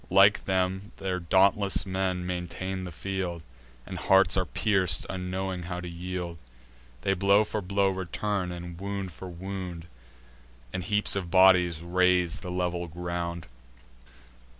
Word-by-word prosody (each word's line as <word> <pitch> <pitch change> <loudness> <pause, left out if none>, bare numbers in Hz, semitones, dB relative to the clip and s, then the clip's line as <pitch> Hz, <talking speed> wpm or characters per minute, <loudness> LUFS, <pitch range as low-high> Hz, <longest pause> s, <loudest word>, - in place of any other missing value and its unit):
Like 100 +2 +5
them, 95 +1 0
their 95 -1 -2
dauntless 95 +1 +3
men 95 -1 -1
maintain 90 +1 -4
the 90 - -6
field; 90 -1 -4 0.4
And 90 -2 -6
hearts 95 +3 +5
are 95 -2 +1
pierc'd, 95 -4 +2
unknowing 95 0 -3
how 90 0 -4
to 90 - -6
yield: 85 -1 -5 0.6
They 95 - +2
blow 100 +2 +4
for 105 0 -3
blow 100 +1 +1
return, 95 0 -2
and 85 -1 -7
wound 100 -2 -4
for 95 - -9
wound; 90 -1 -6 0.9
And 90 - -3
heaps 105 +2 +1
of 95 -3 -3
bodies 90 -3 +5
raise 90 -1 +2
the 90 - -7
level 90 -1 -2
ground. 85 0 -4
90 Hz, 135 wpm, -28 LUFS, 90-95 Hz, 0.9 s, Like